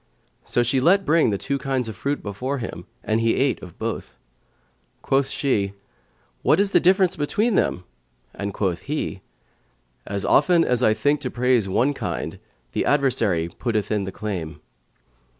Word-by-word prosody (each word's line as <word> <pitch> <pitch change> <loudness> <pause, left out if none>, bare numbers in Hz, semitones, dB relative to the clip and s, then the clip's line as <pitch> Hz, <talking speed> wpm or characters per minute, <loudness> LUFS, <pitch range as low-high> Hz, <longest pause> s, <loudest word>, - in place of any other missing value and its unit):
So 120 - +1
she 130 +2 +1
let 195 +7 +4
bring 160 -4 +4
the 100 - 0
two 140 +7 -2
kinds 135 -3 -1
of 110 - -6
fruits 145 +1 -2
before 125 +8 -3
him; 90 -8 -6 0.2
and 110 +1 0
he 115 0 +2
ate 135 -4 +1
of 90 -2 -11
both. - - -5 0.9
Quoth 135 0 +1
she, 100 -8 0 0.7
"What - - +3
is 200 0 +2
the - - +5
difference 185 0 +3
between 210 +10 0
them?" 90 - +1 0.5
and 100 0 -4
quoth 95 -3 -1
he, 145 -10 -3 0.9
"As 100 0 -3
often 165 +3 +4
as 125 -1 +1
I 110 -3 +4
think 145 +6 +1
to 125 - -2
praise 125 -5 +1
one 130 +9 +2
kind, - - -4 0.3
the - - 0
adversary 120 - +2
putteth 105 +3 -2
in 105 -1 +1
its 95 - -7
claim." 95 -7 -4
125 Hz, 165 wpm, -23 LUFS, 100-145 Hz, 0.9 s, the